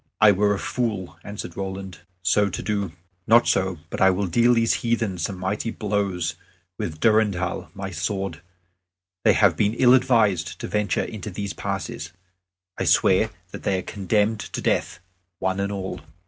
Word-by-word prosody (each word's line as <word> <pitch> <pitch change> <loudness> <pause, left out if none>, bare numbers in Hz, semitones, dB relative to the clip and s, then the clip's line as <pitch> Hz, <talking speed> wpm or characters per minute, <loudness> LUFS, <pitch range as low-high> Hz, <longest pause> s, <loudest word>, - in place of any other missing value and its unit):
"I 105 -1 +8
were 100 +1 +2
a - - -3
fool," 105 -5 -3
answered 100 -4 -7
Roland, 95 -1 -5 0.2
"so 100 +2 +3
to - - -5
do. 100 -5 -2 0.3
Not 120 +2 +6
so; 95 -2 +1
but - - -4
I 95 - +7
will 95 +2 +1
deal 120 +7 +4
these 115 0 +3
heathen 115 -6 0
some 95 +3 -2
mighty 100 +5 -2
blows 100 -6 -1 0.5
with 80 -2 -4
Durendal, 105 -5 +1
my 95 -1 -5
sword. 95 0 -3 0.8
They - - +6
have - - +4
been 105 +2 +1
ill 125 0 +6
advised 115 -8 +3
to - - -4
venture 105 -1 0
into 105 -1 -6
these 100 +1 -4
passes. 80 +4 -4 0.7
I - - +1
swear - - +4 0.2
that - - -7
they 95 - 0
are 90 - -3
condemned 105 +3 0
to - - -5
death, 85 - -1 0.4
one 95 +1 -1
and 100 +1 -1
all." 95 -2 -4
100 Hz, 165 wpm, -24 LUFS, 95-110 Hz, 0.8 s, I